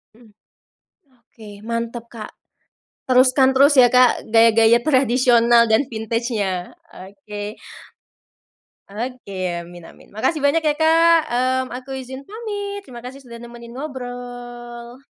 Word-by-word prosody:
Mmm. 230 -2 -20 0.9
Oke 220 -2 -15 0.2
mantap, 230 0 -4
Kak, 225 -2 -9 0.8
teruskan 260 +1 +4
terus 280 +2 +5
ya, 245 - +6
Kak, 250 -1 +4
gaya-gaya 225 0 +5
tradisional 240 -4 +3
dan 220 +6 +3
vintage-nya, 220 -5 -3 0.2
oke. 205 +2 -9 1.3
Oke, 225 -2 -7 0.2
amin 175 0 -13
amin. - - -17
Makasih 250 +9 -2
banyak 310 +3 +1
ya, 300 - +3
Kak, 330 +1 +4
mmm, 255 +2 0
aku 265 +1 -9
izin 260 +1 -8
pamit. 405 -2 -6
Terima 240 -5 -11
kasih 265 +2 -9
sudah 235 -3 -12
nemenin 235 0 -12
ngobrol. 245 -3 -8
245 Hz, 115 wpm, -20 LUFS, 230-265 Hz, 1.3 s, ya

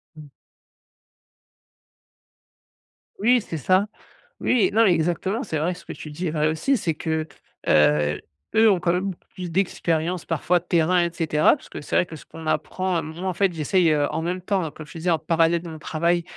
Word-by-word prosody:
Mmh. 155 -1 -11 2.9
Oui, 240 +4 +4
c'est 165 - -6
ça. 185 +7 +2 0.5
Oui, 210 -7 +3
non, 225 +2 +5
mais 185 - +5
exactement. 175 +7 0
C'est 160 -7 -3
vrai, 165 +4 0
ce 175 -1 -13
que - - -6
tu 155 - -9
dis 175 +5 -4
est 155 - -1
vrai 155 -1 +1
aussi, 160 - +1
c'est 165 -7 -1
que, 160 0 -2 0.4
heu, 75 0 +3 0.3
eux 220 0 +6
ont 190 -3 +3
quand 170 0 +1
même 180 +2 -1
beaucoup 175 - -15
plus 180 -2 -5
d'expérience 170 -1 0
parfois 170 +2 +1
de 175 - -23
terrain 175 +1 +3
et - - -1
cetera, 155 - +3
puisque - - -10
c'est - - -3
vrai - - +4
que 165 - -10
ce - - -13
qu'on 165 0 -11
apprend, 185 +2 -1
heu, - - -2
moi, 160 +5 -6
en 185 - 0
fait, 195 +2 +2
j'essaie, 165 +2 +2
heu, 145 -1 +2
en - - -2
même 180 +2 -2
temps, 190 0 0
heu, - - -3
comme 155 - -10
je 150 - -11
disais, 175 +3 -1
en 165 - +3
parallèle 165 +1 +2
de 170 - -7
mon 160 -1 -8
travail, 170 +3 0
170 Hz, 210 wpm, -23 LUFS, 160-185 Hz, 2.9 s, eux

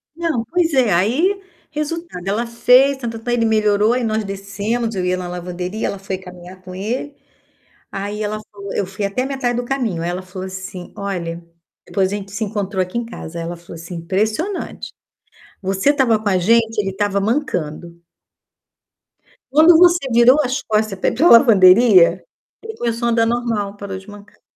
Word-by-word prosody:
Não, 325 -9 -1
pois 335 +4 0
é, 245 -7 +3
aí, 285 - +2 0.3
resultado, 305 - -5
ela 225 +4 0
fez, 250 +4 +4
tá-tá-ta´, 235 -1 -4
ele 235 -1 +2
melhorou, 215 0 +3
aí 250 -1 -1
nós 220 -1 -1
descemos, 200 +4 -3
eu 185 -1 -2
ia 180 0 +1
na 180 -1 -5
lavanderia, 180 +3 -4
ela 200 - -4
foi 190 -1 -5
caminhar 180 0 -12
com 185 0 -10
ele. 240 +9 -4 0.8
Aí 205 +2 -4
ela 215 0 -2
falou 200 -1 -8
eu 200 - 0
fui 195 +2 -5
até 200 +6 -1
a 260 - -3
metade 255 -3 -2
do 245 - -2
caminho, 240 -10 -2
aí 175 - -1
ela 180 +1 -3
falou 185 0 -7
assim: 190 -1 -8
"Olha", 175 -4 -4 0.4
depois 195 -1 0
a - - 0
gente 195 -1 -8
se 220 +2 -2
encontrou 200 -2 -2
aqui 185 +6 -4
em 235 - -2
casa, 170 -7 -8
aí 165 - -4
ela 175 +1 -5
falou 170 0 -12
assim: 170 +2 -9
"Impressionante. 215 - -3 0.7
Você 195 +7 +1
estava 260 -7 +3
com 215 - -3
a 185 -2 +2
gente, 225 +4 +2
ele 195 -2 0
estava 200 0 -1
mancando" 175 - -2 1.5
"quando 320 +3 +7
você 345 -4 +4
virou 240 +4 +6
as 265 +1 -2
costas 215 -2 -1
pra - - +1
ir - - -5
pra 315 +9 +4
lavanderia, 190 -5 +6 0.4
ele 445 0 -7
começou 235 0 -2
a - - +2
andar 230 0 +2
normal, 225 -4 -2
parou 195 -2 -6
de 190 - -16
mancar". 205 0 -14
210 Hz, 185 wpm, -19 LUFS, 190-240 Hz, 1.5 s, quando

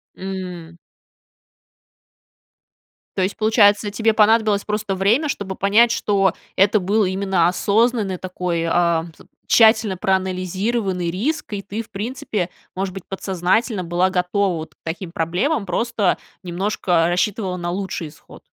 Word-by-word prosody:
М. 180 -3 -7 2.4
То 190 - +1
есть, 190 +2 -1
получается, 210 -2 +4
тебе 220 +2 +1
понадобилось 215 -1 +3
просто 210 -2 -2
время, 230 +11 +2
чтобы 190 -5 -4
понять, 220 +4 +4
что 195 -5 +1 0.2
это 200 +2 +4
был 205 +3 +1
именно 190 -2 +1
осознанный 205 +1 +1
такой, 180 -2 -3
а, 170 -1 +2
пс - - -17 0.2
тщательно 220 -4 +4
проанализированный 190 0 -1
риск, 235 - -2
и 200 - -3
ты 210 +3 -5
в 220 - -23
принципе 205 -3 -3 0.3
может 190 0 -3
быть, 195 - -8
подсознательно 190 +2 -1
была 175 +2 +1
готова 185 +1 0
вот 160 0 -7
к - - -47
таким 170 +1 -5
проблемам, 190 - -1
просто 215 0 0 0.3
немножко 175 -2 0
рассчитывала 185 +1 -1
на 175 0 -3
лучший 185 -3 -3
исход. 150 0 -15
195 Hz, 130 wpm, -21 LUFS, 180-215 Hz, 2.4 s, получается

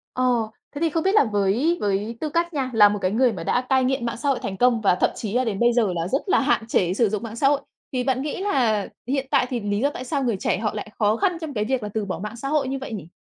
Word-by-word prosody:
Ờ, 255 - 0 0.5
thế 285 - -5
thì 330 - +3
không 325 +1 -1
biết 385 +2 +2
là 425 - +6
với 220 - +1
với 205 +3 -1
tư 310 - -1
cách 340 +3 0
nha, 270 -3 -1
là 210 -2 +7
một 205 0 -2
cái 185 - +1
người 245 +3 +3
mà 185 - -6
đã 245 - +1
cai 265 -1 +3
nghiện 255 -2 0
mạng 235 0 -3
xã 285 +4 -1
hội 270 - +1
thành 195 -1 -4
công 245 -1 +3
và 195 -4 +3
thậm - - +2
chí 215 -3 -5
là 250 +2 +2
đến 215 -5 -2
bây 240 0 +4
giờ 225 -6 +2
là 165 0 -2
rất 270 +9 0
là - - +4
hạn 265 -5 +1
chế 180 -6 +1
sử 220 +2 +2
dụng 215 +2 -3
mạng 225 -1 -6
xã 275 +4 +2
hội, 285 0 +2 0.3
thì 250 -1 0
bạn 260 0 0
nghĩ 295 +5 -4
là 240 - +1 0.2
hiện 270 +1 -1
tại 275 -3 +4
thì 250 - -2
lý 205 -1 -1
do 280 +5 +2
tại 255 - -7
sao 275 +2 -2
người 235 -5 0
trẻ - - 0
họ 215 +1 -2
lại 215 0 -6
khó 210 0 +3
khăn 360 - 0
trong 315 -3 -5
cái 210 -3 -1
việc 255 0 -1
là 210 - -4
từ 220 -2 -1
bỏ 190 - -4
mạng 210 +3 -6
xã 240 +4 -5
hội 290 -2 +1
như 270 +1 -2
vậy 260 - -6
nhỉ? 195 -7 -6
240 Hz, 320 wpm, -23 LUFS, 210-275 Hz, 0.5 s, là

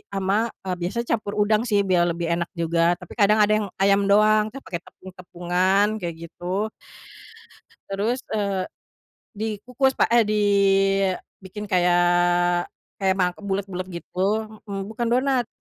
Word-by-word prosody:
ama, 195 +4 +1 0.2
eee, 185 -1 -2
biasanya 230 +7 -2
campur 205 -3 -1
udang 215 +3 +1
sih 205 -3 +2
biar 180 -3 +2
lebih 170 -1 -3
enak 170 0 -1
juga 170 +1 +1
tapi 180 -1 -12
kadang 210 +1 +4
ada 210 - +2
yang 205 - -3 0.2
ayam 200 0 +4
doang 215 +1 +4
kan 275 +5 -9
pakai 170 -2 -5
tepung-tepungan 185 +1 -1
kayak 170 -4 -4
gitu. 185 +5 -3 1.2
Terus, 220 +6 -1
eee, 200 -3 -2 0.7
dikukus 235 +5 -1
pak - - +1
eh, 235 -2 +4
dibikin 195 -1 0
kayak, 175 0 +3 0.3
kayak 190 -1 +2
ma 180 -2 +1
bulet-bulet 195 -2 -4 0.2
gitu, 200 +4 -1 0.2
m 195 -1 -4
bukan 235 +2 -3
donat 255 +1 +1
195 Hz, 135 wpm, -23 LUFS, 180-215 Hz, 1.2 s, kadang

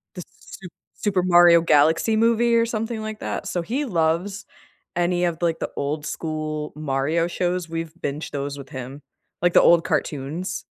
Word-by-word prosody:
The 180 - -6 0.2
Su 190 - -11 0.3
Super 195 -4 0
Mario 175 -1 +6
Galaxy 160 +7 +3
Movie 230 +1 +3
or 230 0 +4
something 225 0 -3
like 215 0 -6
that, - - -4
so 175 - -2
he 255 - -2
loves 180 - -1 0.5
any 175 0 +1
of, 170 -2 -1
like, 170 -2 0
the - - -4
old 150 +1 -3
school 155 -1 -4
Mario 155 +3 0
shows, 175 -1 -2
we've 165 -1 -4
binged 145 +3 -4
those 140 0 -4
with 140 -1 -10
him. 130 +2 -8 0.4
Like, 175 -1 +3
the - - +7
old 170 -1 +5
cartoons. 150 +7 -3
170 Hz, 165 wpm, -23 LUFS, 155-190 Hz, 0.5 s, the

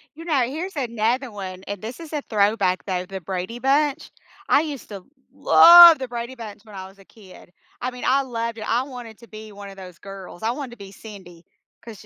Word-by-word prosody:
You 330 - -11
know, 300 -6 +1
here's 325 +8 -6
another 240 -1 -1
one, 190 -2 -8
and 205 0 -6
this 230 +6 -8
is 325 -2 -10
a 300 - -2
throwback, 200 -3 +1
though, 185 -2 -3
The 190 +1 -7
Brady 185 +5 -5
Bunch. 285 +3 0 0.4
I - - +4
used 295 -4 -7
to 195 -3 -9 0.3
love 340 -1 +9
The 260 - -5
Brady 240 +1 -6
Bunch 215 -5 -9
when 215 -3 -14
I 190 0 -8
was 195 +1 -19
a 195 - -18
kid. 190 -5 -17 0.3
I 250 - -2
mean, 250 0 -10
I 270 +2 +3
loved 230 -3 -5
it - - -6
I 240 +3 +1
wanted 245 -5 -10
to 235 - -16
be 215 -1 -11
one 200 0 -10
of 195 - -12
those 180 -2 -11
girls, 195 0 -11
I 225 - +1
wanted 265 -1 -6
to 240 - -13
be 200 -2 -11
Cindy, 190 -5 -13 0.4
'cause 225 -3 -12
225 Hz, 225 wpm, -22 LUFS, 195-260 Hz, 0.4 s, love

